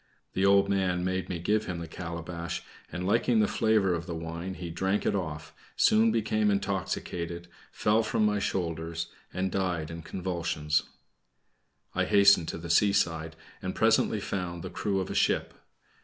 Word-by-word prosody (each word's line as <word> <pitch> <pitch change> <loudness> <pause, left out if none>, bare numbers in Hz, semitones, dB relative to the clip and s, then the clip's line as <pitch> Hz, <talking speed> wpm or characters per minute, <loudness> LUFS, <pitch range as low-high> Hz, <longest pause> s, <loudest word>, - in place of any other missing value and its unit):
The 95 - 0
old 100 0 +5
man 95 -3 +1
made 95 0 -2
me 90 - -2
give 105 +5 +1
him 90 -2 -4
the 85 -1 -6
calabash, 85 0 -5 0.3
and 90 +1 -4
liking 115 +3 +3
the 105 - +4
flavor 105 -4 +2
of 85 +1 -3
the 85 - -4
wine, 85 +3 -5
he 85 -2 -6
drank 95 +4 0
it - - +2
off, 80 -5 -4 0.2
soon 110 +1 +4
became 110 -1 +1
intoxicated, 90 -3 -2 0.2
fell 105 +2 +2
from 110 -1 +1
my 105 0 +2
shoulders, 85 -3 -2 0.2
and, 95 +1 -2
died 90 -5 -1
in 85 0 -6
convulsions. 85 -4 -1 1.1
I - - +1
hastened 100 -4 +5
to - - -4
the 85 0 -4
seaside, 85 -5 +2 0.3
and 95 0 -4
presently 110 -1 +3
found 90 -3 -4
the - - -6
crew 100 -2 -1
of 95 - -3
a - - -2
ship. - - +1
90 Hz, 165 wpm, -29 LUFS, 85-100 Hz, 1.1 s, old